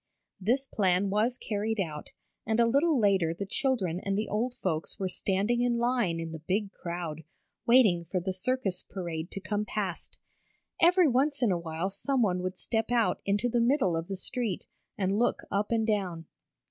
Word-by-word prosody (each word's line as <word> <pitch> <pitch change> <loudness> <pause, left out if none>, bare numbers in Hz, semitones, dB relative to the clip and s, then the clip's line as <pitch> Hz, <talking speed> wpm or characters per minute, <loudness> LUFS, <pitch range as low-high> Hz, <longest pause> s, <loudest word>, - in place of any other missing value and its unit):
This 245 +8 +1
plan 195 -4 +1
was 225 +5 +2
carried 215 0 -2
out, 155 -5 -3 0.3
and 220 +1 0
a 235 - +6
little 280 +5 +3
later 190 -6 +2
the 200 - -4
children 195 - 0
and 195 +1 -2
the 215 - -1
old 240 +4 -1
folks 165 -9 -2
were 190 - -1
standing 200 +6 0
in 245 -1 +2
line 235 -8 +1
in 165 -1 -4
the 160 - -6
big 195 +5 -1
crowd, 170 -4 -5 0.4
waiting 215 -9 +5
for 180 +3 -1
the 185 +2 -3
circus 195 -2 -1
parade 170 -3 -5
to - - -6
come 205 +1 -2
past. 205 -4 -4 0.6
Every 355 0 +6
once 275 +2 +2
in 225 - +4
a 175 - +1
while 170 +3 -3
someone 205 -4 +1
would 185 0 -4
step 225 +3 -1
out 235 -2 +2
into 205 +4 +1
the 240 0 +1
middle 235 - +2
of 165 +1 -3
the 195 - -4
street, 230 -2 -3 0.3
and 195 0 0
look 240 - +1
up 205 +2 0
and 225 -1 +2
down. 190 -7 -1
200 Hz, 185 wpm, -29 LUFS, 180-240 Hz, 0.6 s, a